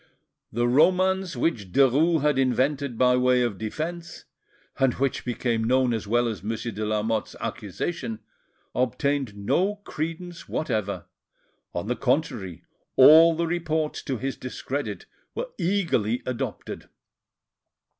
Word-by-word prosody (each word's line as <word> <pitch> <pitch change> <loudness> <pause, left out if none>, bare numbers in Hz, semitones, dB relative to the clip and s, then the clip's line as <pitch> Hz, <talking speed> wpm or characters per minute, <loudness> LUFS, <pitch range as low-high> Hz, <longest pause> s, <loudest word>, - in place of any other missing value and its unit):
The 120 +2 +1
romance 185 +7 +3
which 105 - -1
Derues 145 - +4
had 150 -3 +2
invented 135 0 +1
by 125 +1 +4
way 125 0 +3
of 110 -6 -2
defence, 165 +10 -5 0.5
and 135 -2 +3
which 135 0 -1
became 120 -2 -1
known 125 +1 +2
as 110 -2 -3
well 120 +3 +2
as 110 -5 -4
Monsieur 115 +3 -3
de 105 +1 -4
Lamotte's 110 +1 -1
accusation, 110 - -4 0.6
obtained 130 -2 0
no 185 - +1
credence 165 +2 -5
whatever; 105 -9 -2 0.7
on 85 - -2
the 125 +3 -1
contrary, 125 - -1 0.3
all 160 +5 +8
the 170 +1 0
reports 160 -2 -1
to 135 -3 -3
his 135 +4 -3
discredit 130 +2 -5 0.3
were - - -4
eagerly 165 - 0
adopted. 125 -2 -5
130 Hz, 125 wpm, -25 LUFS, 115-160 Hz, 0.7 s, all